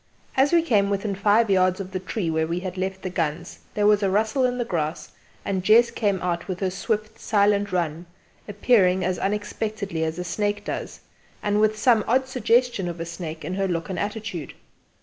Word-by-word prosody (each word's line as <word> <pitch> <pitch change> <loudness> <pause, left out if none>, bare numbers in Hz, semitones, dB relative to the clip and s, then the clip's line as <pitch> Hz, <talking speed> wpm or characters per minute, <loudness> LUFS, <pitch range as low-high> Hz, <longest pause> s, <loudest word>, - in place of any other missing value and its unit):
As 270 +2 +3
we 340 -1 +4
came 205 -10 +2
within 200 +1 -1
five 205 +4 +3
yards 185 0 +3
of 190 -1 -6
the 185 - -3
tree 185 -2 -3
where 160 0 0
we 170 +2 -2
had 185 -1 -5
left 190 0 -3
the 185 - -2
guns 165 0 -3 0.2
there 210 - +1
was 210 0 +5
a 195 - +2
rustle 220 +6 +1
in 250 0 0
the 240 - -1
grass, 160 -5 -3 0.3
and 190 -2 -1
Jess 230 +4 +5
came 200 -4 0
out 175 -1 -2
with 185 -2 -4
her 190 -2 -1
swift 215 +3 -3
silent 205 -1 +2
run, 170 -1 -2 0.4
appearing 195 -3 +3
as 185 0 -1
unexpectedly 205 -3 -2
as 160 +1 -2
a 180 - -3
snake 205 +3 -2
does, - - -5 0.4
and 205 0 +1
with 215 0 +2
some 225 -1 +4
odd 260 +3 +2
suggestion 240 -5 +1
of 170 -1 -5
a 165 - -3
snake 165 -1 -7
in 180 - -3
her 195 +1 0
look 170 +1 -3
and 180 - -3
attitude. 205 -7 -4
200 Hz, 205 wpm, -24 LUFS, 180-215 Hz, 0.4 s, was